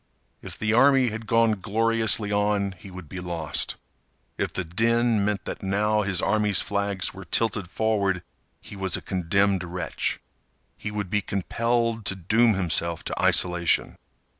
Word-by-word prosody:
If - - -9
the 110 0 0
army 135 +1 +5
had 110 0 -7
gone 115 -2 +3
gloriously 110 -1 +2
on 105 -1 +1
he 100 - -11
would 90 -3 -10
be 95 - -7
lost. 85 -4 -2 0.6
If - - -2
the 95 - -3
din 115 +5 +1
meant 100 -1 -1
that - - -6
now 105 +2 +1
his 95 -3 0
army's 105 -1 +2
flags 100 -2 -2
were 95 +1 -9
tilted 105 0 0
forward 100 -4 0 0.4
he - - -12
was 95 -2 0
a - - -8
condemned 95 +1 +1
wretch. 90 +1 -3 0.6
He - - -6
would 105 -3 -4
be 105 - +1
compelled 115 +3 -1
to 95 - +1
doom 110 +5 +3
himself 85 -2 0
to - - -4
isolation. 85 -2 +2
100 Hz, 155 wpm, -25 LUFS, 95-110 Hz, 0.6 s, army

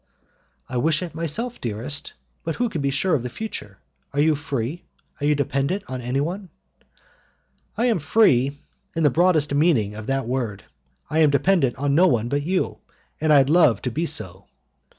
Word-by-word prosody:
"I 125 - -4
wish 155 +6 +1
it 175 - -7
myself, 170 - -2
dearest, 120 +6 -3 0.3
but 165 - -3
who 245 -1 0
can 165 -8 -3
be 140 - +1
sure 140 +7 0
of 145 - +2
the 125 - -4
future? 120 - -7 0.4
Are 140 - -1
you 155 +2 +4
free? 145 +1 -3 0.4
Are 145 - 0
you 150 - +3
dependent 140 +7 -1
on 130 -1 -5
anyone?" 150 +10 -2 1.3
"I 235 - +1
am 230 -7 +2
free 140 - +3 0.4
in 165 - 0
the 145 - +4
broadest 160 -2 +3
meaning 140 -9 +2
of 110 0 -8
that 135 -1 -1
word, 120 -6 -3 0.5
I 155 - +1
am 155 -2 +6
dependent 140 -1 +2
on 140 +1 -1
no 175 +5 +5
one 120 -4 +1
but 145 +2 0
you, 180 +5 -1 0.4
and 155 0 +1
I 140 -2 +7
love 150 -3 +4
to 125 - -2
be 165 +8 -1
so." 95 - -1
145 Hz, 180 wpm, -23 LUFS, 130-165 Hz, 1.3 s, I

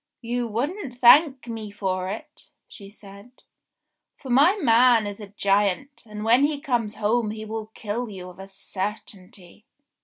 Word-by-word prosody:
"You 240 +1 -2
wouldn't 255 - -4
thank 260 +2 +6
me 225 -2 -6
for 190 -2 -3
it," 295 +9 -9 0.2
she 200 -2 -13
said, 205 +4 -16 0.7
"for 265 - -8
my 300 - +5
man 240 - +4
is 205 0 -6
a 210 - -9
giant, 200 +7 0
and 210 0 -7
when 240 +4 +4
he 295 -1 -2
comes 240 -7 -2
home 220 +1 0
he 215 0 -6
will 220 0 -5
kill 230 +3 -4
you 185 -3 -9
of 180 - -19
a 195 - -9
certainty." 195 -1 -8
220 Hz, 155 wpm, -24 LUFS, 200-245 Hz, 0.7 s, thank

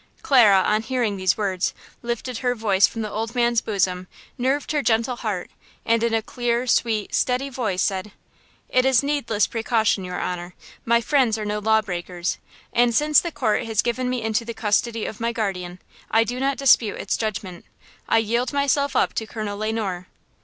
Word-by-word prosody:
Clara, 215 -9 +6
on 215 +1 +2
hearing 225 -2 -1
these 185 -2 +1
words, 190 -3 -1 0.3
lifted 235 0 -4
her 245 -1 0
head 205 -4 0
from 225 - -4
the 215 - -5
old 225 +3 -4
man's 235 -1 +2
bosom, 185 -3 -1 0.3
nerved 265 +4 -1
her 300 -1 +1
gentle 235 0 +1
heart, 210 -6 -4 0.3
and 230 0 +2
in 235 0 +1
a 225 -1 +1
clear, 240 +1 -1
sweet, 225 -4 0
steady 255 +2 0
voice 215 -8 -1
said: 195 +1 -2 0.6
"It 255 - +2
is 265 -1 +4
needless 245 -8 +1
precaution, 225 -3 0
your 180 0 -5
honor; 180 0 -4 0.3
my 235 0 +3
friends 250 -4 +2
are 215 - -4
no 210 0 -2
law 220 +1 +3
breakers, 175 -2 -4 0.3
and 240 -1 +3
since 300 +1 +4
the 340 - -4
court 230 -5 0
has 220 -2 0
given 250 +1 -1
me 250 -2 -2
into 220 +1 0
the 230 0 -7
custody 225 +1 0
of 215 - -6
my 230 0 0
guardian, 185 -5 -3 0.3
I 225 +1 +4
do 245 +2 -4
not 275 0 0
dispute 245 -6 +4
its - - -1
judgment. 200 -5 -4 0.5
I - - +4
yield 235 +3 0
myself 280 0 +1
up - - +2
to 220 - -3
Colonel 210 -2 -5
Le 215 +1 -1
Noir." 190 -5 -3
225 Hz, 190 wpm, -23 LUFS, 205-245 Hz, 0.6 s, Clara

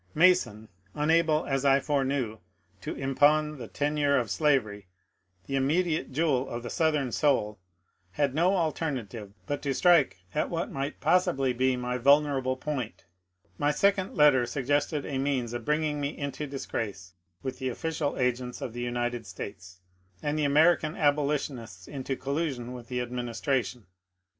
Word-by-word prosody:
Mason, 160 - +3 0.3
unable 155 +1 +2
as 135 -1 -1
I 135 -1 +5
foreknew 135 -6 -1 0.4
to - - -5
impawn 150 +2 +2
the 120 - -6
tenure 145 +1 +1
of 115 -5 -1
slavery, 110 - +1 0.6
the 135 - -3
immediate 155 +4 +1
jewel 135 -3 +1
of 120 0 -5
the 120 - -6
Southern 150 -6 +1
soul, 105 -9 +1 0.5
had 140 +4 +1
no 175 +6 +3
alternative 130 - -3
but 145 0 -3
to 140 -2 -1
strike 165 - +4
at - - 0
what 170 0 -3
might 140 +2 -4
possibly 135 -8 +2
be 130 +1 +1
my 125 0 -2
vulnerable 140 -1 +3
point. 130 -5 -4 0.5
My 145 - +2
second 195 +5 +1
letter 140 -5 +5
suggested 145 +2 0
a 135 -2 -3
means 130 -4 -1
of 120 -2 -5
bringing 150 -1 0
me 140 +1 -3
into 140 +1 -4
disgrace 105 -9 -5 0.3
with 130 - -4
the 130 -1 -1
official 150 +3 -2
agents 125 0 -1
of 115 - -5
the 120 - -5
United 120 -2 -2
States, 90 0 -9 0.4
and 150 0 0
the 155 -1 +1
Ameri 155 +5 +5
can 155 0 -4
abolitionists 140 - -1
into 135 -1 -4
collision 135 -3 -3
with 120 -2 -9
the 125 0 -2
administration. 125 -1 -2
135 Hz, 150 wpm, -28 LUFS, 120-150 Hz, 0.6 s, I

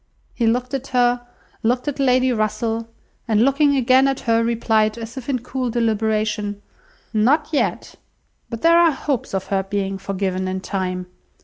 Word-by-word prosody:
He 235 - 0
looked 250 +3 0
at 275 0 -3
her, 245 -1 +2 0.4
looked 250 +4 0
at 290 -1 -3
Lady 255 -1 +3
Russell, 225 +1 -1 0.4
and 220 +1 +3
looking 285 +1 +3
again 260 +1 +4
at 270 -1 -1
her, 230 -1 +2
replied, 220 -1 +1
as 230 0 -7
if 265 0 -7
in 265 - +1
cool 255 0 -3
deliberation— 215 -2 0 0.5
"Not 265 +8 +2
yet. 300 - -1 0.6
But 230 -2 -6
there 335 +1 +6
are 340 -1 +5
hopes 270 -7 -3
of 190 - -2
her 195 - +2
being 195 0 -3
forgiven 190 -1 -2
in 185 0 -3
time. 185 -2 -3
230 Hz, 165 wpm, -21 LUFS, 210-260 Hz, 0.6 s, there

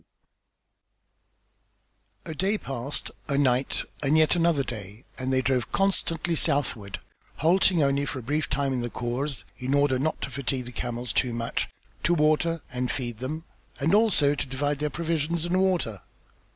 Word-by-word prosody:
XI - - -38 2.2
A - - -3
day 195 +6 +1
passed, 135 - -2 0.2
a 140 - +1
night, 130 -2 +2 0.2
and 145 +2 +3
yet 155 +2 +5
another 165 -4 +3
day 110 -2 -7 0.2
and 130 +1 -1
they 130 0 +2
drove 125 -2 +1
constantly 175 -3 +1
southward, 130 -10 0 0.4
halting 175 0 +4
only 140 0 +2
for 140 - -3
a 130 - -6
brief 145 +5 -1
time 135 0 0
in 125 - -1
the 120 - -2
khors 125 +4 -3 0.2
in 130 +2 0
order 140 -2 +3
not 155 +4 0
to - - -3
fatigue 135 -2 -2
the 125 - -7
camels 120 0 -3
too 125 -3 +1
much, 115 0 -2 0.3
to 175 - +3
water 155 +1 +2
and 125 0 -1
feed 120 -4 -3
them, 155 +6 -4 0.4
and 150 +5 +2
also 205 -10 +4
to 145 - -3
divide 145 +2 -1
their 150 0 0
provisions 165 +1 -1
and 185 +2 +2
water. 175 - +1
140 Hz, 165 wpm, -27 LUFS, 125-160 Hz, 2.2 s, yet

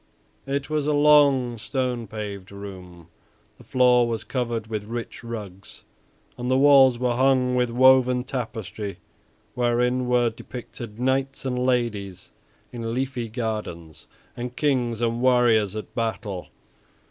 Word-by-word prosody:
It 140 0 -2
was 150 -1 -1
a 150 - +2
long, 140 -5 +4
stone 125 0 -2
paved 100 -2 -7
room. 90 -4 -10 0.5
The - - -14
floor 125 -1 +4
was 115 -2 -3
covered 120 -4 -3
with 110 -2 -4
rich 115 +2 -6
rugs 105 -5 -9 0.6
and 125 +1 -3
the 130 - +3
walls 135 -3 +6
were 125 0 0
hung 130 0 +3
with 125 -1 +1
woven 125 0 +4
tapestry 110 -5 -5 0.6
wherein 125 +1 +1
were 120 -1 +2
depicted 115 -1 -9
knights 135 +2 -1
and 125 -1 -1
ladies 110 -7 -2 0.4
in 115 -1 -4
leafy 130 -3 -3
gardens 105 - -5 0.3
and 120 +1 -6
kings 125 -6 0
and 115 0 0
warriors 120 -5 +3
at 110 - -7
battle. 110 -5 -3
120 Hz, 130 wpm, -24 LUFS, 110-130 Hz, 0.6 s, walls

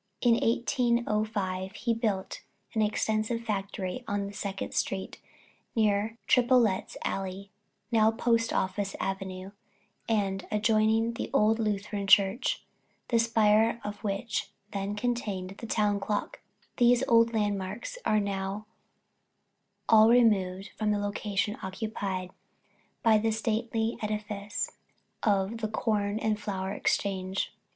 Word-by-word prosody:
In 240 -2 +6
1805 220 -5 0
he 230 0 0
built 215 -5 -2 0.3
an 220 - +1
extensive 215 +2 0
factory 200 0 -3
on 200 0 -2
Second 195 -1 -4
street, 190 -1 -2 0.6
near 215 0 +1
Tripolet's 240 -6 +3
alley 195 +1 -4 0.4
now 220 -1 +5
Post 230 0 +1
Office 195 +1 -1
avenue 190 0 -4 0.6
and 195 -3 0
adjoining 220 +2 +2
the 230 - -4
old 220 -3 +3
Lutheran 205 -1 -2
Church, 195 +3 +4 0.5
the 235 - +3
spire 225 0 +3
of 205 0 -6
which 210 +2 -2 0.2
then 200 +1 -2
contained 210 -5 -2
the 230 - -6
Town 210 -2 +1
Clock; 205 +1 -3 0.4
these 245 -1 +5
old 230 0 +5
landmarks 205 - -2
are 215 - +3
now 200 +1 -3 1.2
all 220 0 +7
removed 200 -5 +3
and 215 -1 +1
the 210 - +1
location 205 0 -2
occupied 190 -2 -4 0.7
by 220 -2 +5
the 225 +1 +1
stately 225 +1 -1
edifice 210 -1 -3 0.5
of 200 +1 +1
the 220 - -1
Corn 210 -1 0
and 220 -1 0
Flour 195 -2 -3
Exchange. 190 -2 -1
210 Hz, 115 wpm, -29 LUFS, 195-225 Hz, 1.2 s, all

